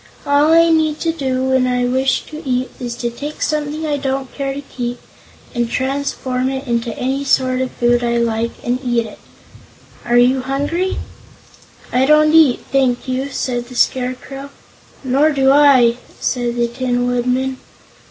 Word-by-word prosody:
All 285 +2 +3
I 330 0 +5
need 315 -2 +2
do, 275 -7 -1
when 260 -1 +2
I 250 0 +1
wish 260 +2 +1
to 310 0 -9
eat, 255 -1 -1
is 240 -2 -4
to 240 -1 -3
take 290 +5 -7
something 305 +1 -2
I 295 -1 0
don't 270 -2 -3
care 275 -1 -3
to 280 +1 -5
keep, 245 -2 -5 0.5
and 240 -2 -1
transform 260 -1 -2
it 270 +1 -5
into 235 -1 -2
any 265 +2 -1
sort 255 -2 +1
of 260 - -1
food 240 0 +2
I 235 0 +1
like, 230 0 0
and 245 +1 -1
eat 240 -2 0
it. 215 - -11 0.8
Are 240 0 +2
you 255 +2 +4
hungry?" 290 +8 -1 1.0
"I 260 +2 +3
don't 305 +1 +5
eat, 315 -6 +5
thank 265 -2 +1
you," 260 +2 -2
said 245 -2 -3
the 250 - -11
Scarecrow. 260 +2 -1 0.5
"Nor 275 +4 +3
do 270 -1 +3
I," 270 -5 +5 0.2
said 240 -2 -1
the 240 0 +1
Tin 245 0 -1
Woodman. 250 +2 -1
260 Hz, 160 wpm, -18 LUFS, 245-280 Hz, 1.0 s, I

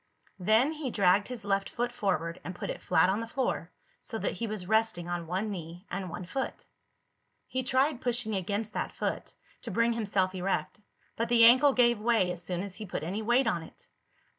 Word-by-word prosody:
Then 220 - +4
he 305 -4 -4
dragged 200 -2 +3
his 245 -5 -7
left 195 -1 0
foot 240 0 -2
forward 180 -8 -1
and 180 - -6
put - - -4
it - - -7
flat - - +4
on 195 +3 +1
the 230 - -4
floor, 260 +3 -2 0.3
so - - -5
that - - -1
he 230 - -4
was 210 -4 -5
resting 220 -4 +1
on 175 -1 -3
one 190 +5 -2
knee 175 0 -7
and 185 0 -3
one 175 +2 -6
foot. 265 +9 -4 0.8
He 260 - -2
tried 260 +1 +1
pushing 240 -3 0
against 205 +3 -2
that - - -3
foot, - - -3 0.3
to - - -6
bring 235 0 +2
himself 200 -4 0
erect, 190 +2 -2 0.4
but 230 +1 -1
the 235 -1 +7
ankle 260 +4 +7
gave 240 -3 +4
way 220 -5 +2
as 175 0 -3
soon 180 +1 -2
as 200 -2 -6
he 215 +2 -7
put 175 - -4
any 190 +7 -3
weight 240 +4 +3
on 170 - 0
it. 160 - -14
210 Hz, 205 wpm, -29 LUFS, 185-240 Hz, 0.8 s, the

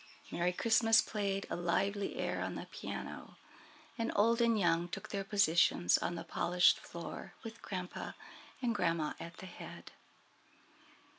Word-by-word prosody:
Merry 175 +1 +1
Christmas 225 +3 +4
played 200 -2 -1
a - - 0
lively 195 +3 0
air - - -2
on - - -3
the - - -5
piano, - - -7 0.6
and 230 - 0
old 230 +3 +4
and 230 -2 +4
young 170 -2 +2
took 175 - -6
their 200 -1 -2
positions 175 - +4
on 175 - -2
the 165 - -5
polished 180 0 +3
floor 170 0 -8
with 225 0 -8
grandpa 180 -2 -5 0.5
and 235 -2 +2
grandma 165 -6 0
at 170 +1 -8
the - - -9
head. 180 - -10
195 Hz, 145 wpm, -34 LUFS, 175-220 Hz, 0.6 s, Christmas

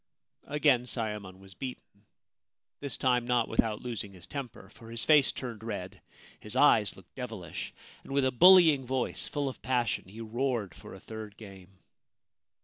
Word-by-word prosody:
Again 140 -4 +3
Sayemon 105 -6 -4
was 95 0 -15
beaten 105 -3 -9 0.3
— - - -62
this 140 -2 -3
time 125 -2 +2
not 120 -2 +2
without 110 -2 0
losing 115 -5 -5
his 90 -3 -10
temper, 115 -4 -7
for 115 0 -14
his 115 0 -2
face 150 -3 +5
turned 115 -4 -7
red, 100 -5 -6 0.4
his - - -7
eyes 105 -3 +5
looked 95 -2 -17
devilish, 115 -9 -6 0.3
and - - -11
with 140 -1 +2
a 130 - +2
bullying 165 -1 +7
voice 130 0 -1
full 145 -2 -2
of 130 - -6
passion 125 -2 0
he 105 +4 -11
roared 115 -3 -2
for - - -11
a - - -11
third 110 -2 -9
game. 95 -3 -13
115 Hz, 165 wpm, -30 LUFS, 105-130 Hz, 0.4 s, bullying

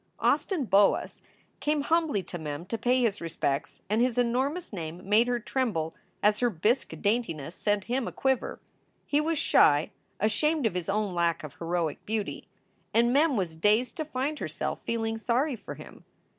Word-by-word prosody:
Austin 345 -9 +1
Boas 200 -2 +3 0.4
came 300 0 +1
humbly 315 - +1
to 175 - -7
Mem 150 +1 -5
to 195 - -3
pay 245 +3 +2
his 210 -4 0
respects, 150 -4 -2
and 215 +4 +1
his 250 -1 +1
enormous 260 +7 0
name 170 0 -6
made 215 +4 +4
her 245 -1 0
tremble 215 -10 -1 0.3
as 210 0 +4
her 245 - +3
bisque 220 +7 0
daintiness 200 - 0
set 205 -1 0
him 245 +4 -1
aquiver. 265 -2 -1 0.5
He 295 +1 +2
was 325 +1 0
shy, 145 - +4 0.3
ashamed 280 - +1
of 220 - +1
his 180 0 -3
own 205 -1 0
lack 170 -1 +1
of 150 -3 -7
heroic 165 -2 -2
beauty; 215 -1 -3 0.5
and 235 +1 +4
Mem 290 -2 +3
was 175 -5 -2
dazed 210 - +2
to 315 - -2
find 295 +1 -2
herself - - -3
feeling 225 -1 -2
sorry 255 +5 +1
for 205 - -8
him. - - -12
225 Hz, 170 wpm, -28 LUFS, 180-255 Hz, 0.5 s, made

